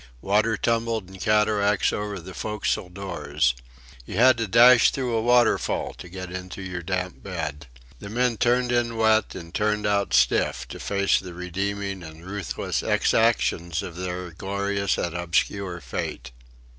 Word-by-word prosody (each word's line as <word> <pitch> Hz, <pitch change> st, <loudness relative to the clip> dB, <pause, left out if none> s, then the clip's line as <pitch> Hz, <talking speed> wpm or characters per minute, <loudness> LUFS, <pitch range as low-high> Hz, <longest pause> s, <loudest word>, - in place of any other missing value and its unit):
Water 105 Hz, +2 st, +2 dB
tumbled 115 Hz, -4 st, -1 dB
in 95 Hz, -, -11 dB
cataracts 105 Hz, -1 st, +2 dB
over 105 Hz, -1 st, -3 dB
the 90 Hz, +2 st, -10 dB
forecastle 105 Hz, -3 st, -2 dB
doors. 75 Hz, -8 st, -1 dB, 0.5 s
You -, -, -8 dB
had 130 Hz, +2 st, +6 dB
to 115 Hz, -, -1 dB
dash 120 Hz, +4 st, +7 dB
through 125 Hz, -3 st, -2 dB
a 115 Hz, -, +1 dB
waterfall 120 Hz, 0 st, +2 dB
to 90 Hz, -, -9 dB
get 95 Hz, 0 st, -7 dB
into 95 Hz, +1 st, -7 dB
your 90 Hz, -1 st, -5 dB
damp 90 Hz, +1 st, -3 dB
bed. 75 Hz, -6 st, -5 dB, 0.3 s
The 100 Hz, -, -8 dB
men 120 Hz, +1 st, +1 dB
turned 125 Hz, +1 st, +2 dB
in 120 Hz, -1 st, 0 dB
wet 110 Hz, -1 st, +3 dB
and 85 Hz, -2 st, -9 dB
turned 105 Hz, 0 st, 0 dB
out 100 Hz, -8 st, +1 dB
stiff -, -, +2 dB
to -, -, -8 dB
face 100 Hz, 0 st, +1 dB
the 90 Hz, -2 st, -9 dB
redeeming 100 Hz, +2 st, -3 dB
and 80 Hz, 0 st, -11 dB
ruthless 100 Hz, 0 st, -3 dB
exactions 85 Hz, -7 st, +1 dB
of 80 Hz, -, -7 dB
their 90 Hz, 0 st, -5 dB
glorious 100 Hz, +2 st, -1 dB
and 85 Hz, -1 st, -2 dB
obscure 85 Hz, +2 st, -1 dB
fate. 60 Hz, +1 st, -5 dB
100 Hz, 155 wpm, -25 LUFS, 90-110 Hz, 0.5 s, dash